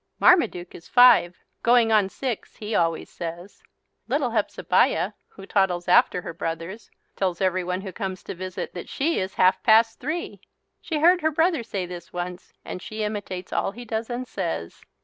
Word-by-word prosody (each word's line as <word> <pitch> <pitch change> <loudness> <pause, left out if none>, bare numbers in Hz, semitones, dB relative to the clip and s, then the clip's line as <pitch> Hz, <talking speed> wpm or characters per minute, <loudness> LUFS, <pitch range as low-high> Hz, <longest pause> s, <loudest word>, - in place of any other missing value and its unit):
Marmaduke 235 - +3
is 165 - -12
five, 245 -8 +6 0.2
"going 235 -1 +4
on 210 -3 +4
six," 250 0 -5
he 215 +1 -5
always 165 -3 +1
says. 175 +3 -8 0.5
Little - - 0
Hepzebiah, - - +1 0.2
who 195 - -13
toddles 190 -3 +1
after 180 0 +4
her - - -6
brothers, 165 +6 -5 0.3
tells 185 -3 -1
everyone 185 -1 0
who 190 -1 -7
comes 190 -3 -5
to - - -6
visit 185 0 -6
that 175 - -8
she 320 +5 0
is 190 0 -4
"half 185 +1 +3
past 225 0 +4
three." 315 +6 -4 0.4
She 320 - -3
heard 350 +2 +5
her 315 - +2
brother 320 -1 +1
say 200 -5 -4
this 175 -1 -9
once 180 0 -6
and 185 - -6
she 215 +2 -5
imitates 205 -3 -5
all 195 - 0
he 245 +1 -9
does 225 0 -3
and 250 +1 -4
says. 85 - -4
195 Hz, 170 wpm, -24 LUFS, 180-235 Hz, 0.5 s, five